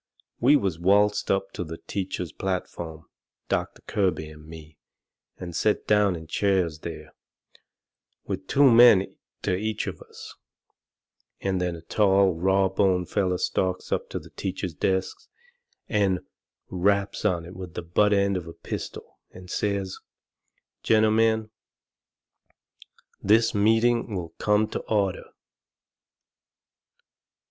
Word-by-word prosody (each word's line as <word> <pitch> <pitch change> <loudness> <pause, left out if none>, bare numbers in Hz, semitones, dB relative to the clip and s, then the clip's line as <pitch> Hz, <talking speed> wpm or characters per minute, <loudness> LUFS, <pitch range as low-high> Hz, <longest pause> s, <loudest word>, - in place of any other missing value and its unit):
We 135 +5 +5
was 95 - 0
waltzed 100 +3 +3
up 95 0 +1
onto 90 - -5
the 80 -1 -7
teacher's 95 -4 -4
platform, 85 -4 -4 0.5
Doctor - - -2
Kirby 90 -6 -1
and 75 0 -14
me, 80 -2 -12 0.6
and 85 -2 -7
set 105 +3 +1
down 105 -3 +3
in 80 -1 -8
chairs 90 -2 0
there, - - -8 1.1
with 95 -1 -5
two 140 -1 +5
men 115 -5 +6 0.3
to 90 - +1
each 110 +2 -2
of - - -6
us, - - -11 1.1
and 95 -2 -1
then 90 -1 -1
a 80 - -11
tall, 95 0 +3
rawboned 95 +1 +1
feller 95 -3 0
stalks 95 0 -1
up - - -1
to - - -4
the - - -10
teacher's 95 -2 -4
desk, 95 +4 -1 0.7
and 100 -4 +1 0.5
raps 100 +2 0
on 90 -5 0
it 90 +2 -11
with 90 -3 -9
the - - -4
butt 105 +5 +2
end 100 -1 +2
of 85 -2 -6
a 85 - -8
pistol, - - -7
and 90 0 -12
says: 100 -2 -2 0.8
"Gentlemen, 110 0 +2 1.7
this 115 +3 +3
meeting 115 +1 +2
will 85 -3 -4
come 105 +1 +2
to - - -3
order." 100 -4 0
95 Hz, 125 wpm, -25 LUFS, 90-105 Hz, 1.7 s, men